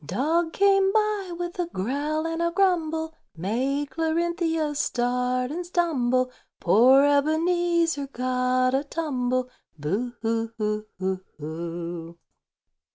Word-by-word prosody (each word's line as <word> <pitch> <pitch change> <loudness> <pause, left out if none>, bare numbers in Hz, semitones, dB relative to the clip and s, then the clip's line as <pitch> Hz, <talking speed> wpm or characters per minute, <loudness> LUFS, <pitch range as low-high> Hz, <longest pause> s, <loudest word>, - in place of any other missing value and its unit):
Dog 320 - 0
came 390 -1 +4
by 425 -3 0
with 350 +1 -5
a 350 - 0
growl 295 - -2
and 330 0 -2
a 340 - +2
grumble, 325 -4 +1 0.2
Made 260 - -1
Clarinthia 325 -1 0
start 250 0 0
and 350 +4 -3
stumble; 255 -8 +1 0.3
Poor 250 +9 +6
Ebenezer 330 +1 +2
got 255 0 +1
a 270 +1 +2
tumble, 255 -5 -2 0.3
Boo 200 +12 -2
hoo 225 0 -1
hoo 215 0 -2
hoo 190 0 -2 0.2
hoo! 170 +2 -6
280 Hz, 110 wpm, -25 LUFS, 240-335 Hz, 0.3 s, Poor